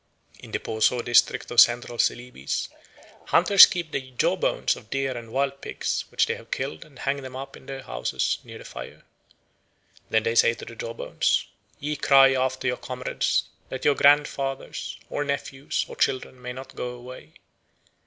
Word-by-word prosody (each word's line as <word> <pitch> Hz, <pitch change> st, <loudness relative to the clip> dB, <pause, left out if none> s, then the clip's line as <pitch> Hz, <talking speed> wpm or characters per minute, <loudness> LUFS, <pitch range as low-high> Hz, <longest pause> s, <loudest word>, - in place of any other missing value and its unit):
In -, -, -12 dB
the -, -, -1 dB
Poso 110 Hz, +2 st, +1 dB
district 120 Hz, -, +3 dB
of 120 Hz, -, +8 dB
Central 120 Hz, 0 st, +2 dB
Celebes 120 Hz, -, -1 dB, 0.6 s
hunters 200 Hz, -2 st, +8 dB
keep 170 Hz, -3 st, -4 dB
the 140 Hz, -, -1 dB
jawbones 125 Hz, -, +1 dB
of 110 Hz, -, -14 dB
deer 135 Hz, 0 st, -1 dB
and 115 Hz, -1 st, -8 dB
wild 140 Hz, +1 st, -1 dB
pigs -, -, -3 dB
which -, -, +2 dB
they -, -, -1 dB
have -, -, -15 dB
killed 80 Hz, -, -4 dB
and 140 Hz, -4 st, -19 dB
hang 140 Hz, +3 st, -1 dB
them 130 Hz, -1 st, -9 dB
up 135 Hz, +1 st, -7 dB
in -, -, -16 dB
their 135 Hz, -1 st, -6 dB
houses -, -, -2 dB
near -, -, -10 dB
the -, -, -12 dB
fire. -, -, -9 dB, 1.1 s
Then 110 Hz, -1 st, +2 dB
they 115 Hz, -, 0 dB
say 115 Hz, 0 st, +4 dB
to -, -, -10 dB
the 115 Hz, -, -10 dB
jawbones, 115 Hz, 0 st, -1 dB, 0.3 s
"Ye 150 Hz, +1 st, -2 dB
cry 135 Hz, -1 st, +6 dB
after 130 Hz, 0 st, -1 dB
your 125 Hz, -, 0 dB
comrades, 125 Hz, 0 st, -1 dB, 0.3 s
that 130 Hz, -, -6 dB
your 145 Hz, -, +5 dB
grandfathers, 140 Hz, -1 st, +1 dB
or 145 Hz, -, -2 dB
nephews, 140 Hz, -1 st, -3 dB
or -, -, -9 dB
children 130 Hz, -1 st, -1 dB
may 125 Hz, 0 st, -5 dB
not 130 Hz, +1 st, -10 dB
go 125 Hz, -, -4 dB
away." 125 Hz, -10 st, -12 dB
130 Hz, 175 wpm, -25 LUFS, 120-135 Hz, 1.1 s, of